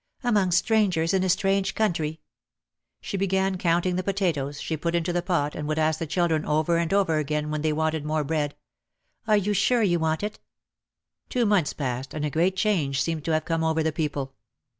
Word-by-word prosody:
"Among 210 Hz, -6 st, +2 dB
strangers 185 Hz, -2 st, +2 dB
in 190 Hz, -1 st, +2 dB
a 190 Hz, -, 0 dB
strange 195 Hz, +1 st, +1 dB
country." 160 Hz, -7 st, -1 dB, 0.8 s
She 200 Hz, -, -4 dB
began 190 Hz, -1 st, 0 dB
counting 175 Hz, +1 st, +1 dB
the 185 Hz, -, -1 dB
potatoes 170 Hz, -8 st, -1 dB
she 160 Hz, -, -3 dB
put 170 Hz, +2 st, -2 dB
into 170 Hz, +1 st, 0 dB
the 175 Hz, -, +1 dB
pot 170 Hz, -5 st, 0 dB
and 150 Hz, -, -5 dB
would 155 Hz, 0 st, -1 dB
ask 155 Hz, 0 st, +1 dB
the 165 Hz, -, -3 dB
children 160 Hz, -1 st, +1 dB
over 155 Hz, +3 st, +1 dB
and 170 Hz, -1 st, -1 dB
over 190 Hz, -6 st, +2 dB
again 150 Hz, 0 st, -2 dB
when 155 Hz, -1 st, -2 dB
they 155 Hz, 0 st, +1 dB
wanted 160 Hz, 0 st, -1 dB
more 155 Hz, 0 st, 0 dB
bread, 145 Hz, -1 st, -1 dB, 0.7 s
"Are 215 Hz, -1 st, +5 dB
you 205 Hz, +1 st, 0 dB
sure 240 Hz, +3 st, +2 dB
you 175 Hz, -4 st, +2 dB
want 160 Hz, +2 st, 0 dB
it?" 210 Hz, 0 st, -4 dB, 0.9 s
Two 245 Hz, -2 st, +1 dB
months 200 Hz, -7 st, +2 dB
passed 130 Hz, 0 st, -4 dB
and 150 Hz, -1 st, -2 dB
a 150 Hz, -, -2 dB
great 175 Hz, +6 st, +1 dB
change 170 Hz, -10 st, +1 dB
seemed 160 Hz, -1 st, -1 dB
to 165 Hz, -, 0 dB
have 155 Hz, -, 0 dB
come 165 Hz, -1 st, -1 dB
over 160 Hz, 0 st, +1 dB
the 160 Hz, -, +1 dB
people. 145 Hz, -3 st, -3 dB
165 Hz, 205 wpm, -25 LUFS, 155-190 Hz, 0.9 s, Are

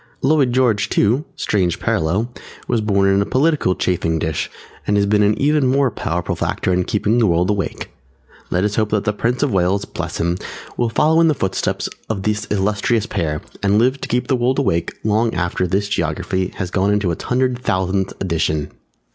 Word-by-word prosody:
Lloyd 135 Hz, -2 st, +3 dB
George 120 Hz, -5 st, +2 dB
too 120 Hz, +9 st, +2 dB
(strange 90 Hz, -5 st, 0 dB
parallel!) 95 Hz, +10 st, 0 dB, 0.3 s
was 115 Hz, -, +1 dB
born 100 Hz, -2 st, +2 dB
in 100 Hz, 0 st, +3 dB
a -, -, +3 dB
political 135 Hz, -, +2 dB
chafing 80 Hz, -2 st, 0 dB
dish 80 Hz, -1 st, -2 dB, 0.4 s
and 105 Hz, -, +2 dB
has 100 Hz, -, +3 dB
been 105 Hz, +1 st, +3 dB
an 105 Hz, +1 st, +2 dB
even 145 Hz, -1 st, +3 dB
more 135 Hz, 0 st, +2 dB
powerful 90 Hz, -3 st, -2 dB
factor 95 Hz, -, -1 dB
in 90 Hz, 0 st, +1 dB
keeping 105 Hz, +3 st, +1 dB
the 115 Hz, -, +4 dB
world 90 Hz, +2 st, +2 dB
awake. 100 Hz, -3 st, -3 dB, 0.6 s
Let 90 Hz, +1 st, +1 dB
us 105 Hz, 0 st, -1 dB
hope 110 Hz, -1 st, +1 dB
that 105 Hz, -1 st, 0 dB
the 105 Hz, -, 0 dB
Prince 120 Hz, +6 st, 0 dB
of 140 Hz, -, 0 dB
Wales 95 Hz, +2 st, +1 dB
(Bless -, -, -5 dB
him) 85 Hz, +1 st, 0 dB, 0.4 s
will 120 Hz, -1 st, 0 dB
follow 160 Hz, +7 st, +3 dB
in 165 Hz, -, +5 dB
the 155 Hz, -, +2 dB
footsteps 95 Hz, -6 st, -1 dB, 0.2 s
of 100 Hz, -3 st, -2 dB
this 105 Hz, +1 st, -1 dB
illustrious 105 Hz, +2 st, +1 dB
pair 75 Hz, -8 st, -2 dB, 0.2 s
and 100 Hz, +1 st, +2 dB
live 130 Hz, +4 st, +2 dB
to -, -, -5 dB
keep 125 Hz, +1 st, 0 dB
the 135 Hz, -, +1 dB
world 125 Hz, +2 st, +1 dB
awake 85 Hz, -12 st, 0 dB
long 110 Hz, +2 st, +1 dB
after 90 Hz, +1 st, -1 dB
this 100 Hz, +3 st, 0 dB
Geography 95 Hz, +1 st, -1 dB
has 90 Hz, -1 st, -4 dB
gone 100 Hz, +1 st, +1 dB
into 105 Hz, -3 st, +1 dB
its 85 Hz, -, -5 dB
hundred 125 Hz, 0 st, +1 dB
thousandth 95 Hz, -3 st, 0 dB
edition! 80 Hz, -4 st, -1 dB
105 Hz, 195 wpm, -19 LUFS, 90-120 Hz, 0.6 s, in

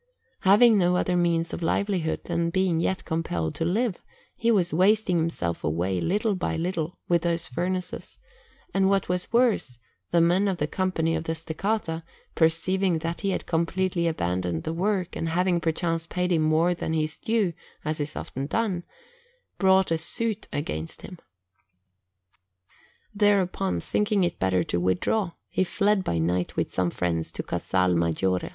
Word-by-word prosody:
Having 210 Hz, +3 st, +6 dB
no 180 Hz, 0 st, +3 dB
other 180 Hz, 0 st, +1 dB
means 170 Hz, -1 st, +1 dB
of -, -, -4 dB
livelihood, 175 Hz, -1 st, 0 dB
and 170 Hz, -1 st, 0 dB
being 185 Hz, -2 st, +1 dB
yet 190 Hz, +3 st, -1 dB
compelled 120 Hz, -, -2 dB
to -, -, -3 dB
live, 200 Hz, +4 st, 0 dB, 0.4 s
he 230 Hz, -, 0 dB
was 185 Hz, -7 st, +2 dB
wasting 190 Hz, +1 st, +3 dB
himself 160 Hz, -, -2 dB
away 90 Hz, +4 st, 0 dB
little 210 Hz, +4 st, +1 dB
by 180 Hz, -3 st, -2 dB
little 170 Hz, 0 st, -2 dB
with 170 Hz, -2 st, +3 dB
those 170 Hz, -1 st, -1 dB
furnaces; 180 Hz, +7 st, -4 dB, 0.6 s
and 195 Hz, 0 st, +3 dB
what 195 Hz, -1 st, +1 dB
was 180 Hz, 0 st, -1 dB
worse, 230 Hz, -, +2 dB, 0.3 s
the 170 Hz, -, +3 dB
men 175 Hz, +4 st, +3 dB
of 190 Hz, -2 st, 0 dB
the 150 Hz, -, 0 dB
Company 165 Hz, -1 st, 0 dB
of 160 Hz, 0 st, -3 dB
the 160 Hz, -, -1 dB
Steccata, 165 Hz, +1 st, -2 dB, 0.3 s
perceiving 175 Hz, +2 st, +2 dB
that 165 Hz, 0 st, -4 dB
he 200 Hz, -, 0 dB
had 190 Hz, -, -2 dB
completely 170 Hz, +1 st, 0 dB
abandoned 90 Hz, -, -1 dB
the 160 Hz, -, -3 dB
work, 185 Hz, +1 st, -1 dB
and 165 Hz, -, -2 dB
having 175 Hz, +1 st, +1 dB
perchance 165 Hz, 0 st, -1 dB
paid 180 Hz, +1 st, -1 dB
him 165 Hz, -2 st, +3 dB
more 160 Hz, +3 st, +3 dB
than 165 Hz, -2 st, -3 dB
his 155 Hz, -1 st, -1 dB
due, 220 Hz, -6 st, +1 dB, 0.3 s
as 155 Hz, 0 st, -1 dB
is 145 Hz, 0 st, -3 dB
often 135 Hz, +2 st, -5 dB
done, 200 Hz, -1 st, 0 dB, 0.8 s
brought 190 Hz, -2 st, +4 dB
a 165 Hz, -, +2 dB
suit 220 Hz, +5 st, -2 dB
against 80 Hz, -, -4 dB
him. 180 Hz, -, -9 dB, 1.9 s
Thereupon, 190 Hz, -, +2 dB
thinking 210 Hz, -, +1 dB
it 175 Hz, -1 st, -1 dB
better 95 Hz, -1 st, +2 dB
to 85 Hz, -, -1 dB
withdraw, 165 Hz, -, 0 dB
he -, -, 0 dB
fled 200 Hz, +1 st, +1 dB
by 85 Hz, -, -1 dB
night 90 Hz, +2 st, 0 dB
with -, -, -1 dB
some 90 Hz, -1 st, 0 dB
friends 85 Hz, -2 st, -2 dB
to -, -, -4 dB
Casal 90 Hz, -1 st, 0 dB
Maggiore. 85 Hz, +2 st, 0 dB
170 Hz, 160 wpm, -26 LUFS, 155-190 Hz, 1.9 s, Having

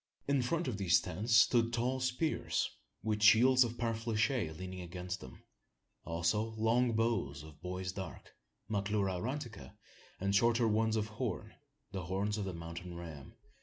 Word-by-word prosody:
In 140 Hz, -2 st, +3 dB
front 155 Hz, +6 st, 0 dB
of 110 Hz, -5 st, -2 dB
the 95 Hz, -3 st, -3 dB
tents 95 Hz, +6 st, +3 dB
stood 115 Hz, +1 st, +5 dB
tall 125 Hz, +3 st, 0 dB
spears, 130 Hz, +5 st, 0 dB, 0.3 s
with 105 Hz, -1 st, -1 dB
shields 125 Hz, +4 st, +7 dB
of 120 Hz, 0 st, -4 dB
parfleche 115 Hz, -, 0 dB
leaning 95 Hz, 0 st, -6 dB
against 90 Hz, +1 st, -5 dB
them; 65 Hz, -1 st, -12 dB, 0.6 s
also 85 Hz, +7 st, 0 dB
long 115 Hz, +2 st, +3 dB
bows 110 Hz, -12 st, 0 dB
of 75 Hz, -1 st, -13 dB
bois 90 Hz, +1 st, -3 dB
d'arc 95 Hz, -1 st, -7 dB, 0.4 s
(Maclura 100 Hz, -2 st, 0 dB
aurantica), 125 Hz, -1 st, -5 dB, 0.4 s
and 100 Hz, +1 st, 0 dB
shorter 115 Hz, +2 st, +4 dB
ones 110 Hz, +1 st, +2 dB
of 110 Hz, -1 st, +1 dB
horn 110 Hz, 0 st, -4 dB, 0.4 s
the 95 Hz, -3 st, -4 dB
horns 100 Hz, +4 st, -1 dB
of 100 Hz, -, -2 dB
the 95 Hz, -, -4 dB
mountain 85 Hz, +1 st, -7 dB
ram. 80 Hz, -6 st, -9 dB
105 Hz, 150 wpm, -34 LUFS, 90-115 Hz, 0.6 s, shields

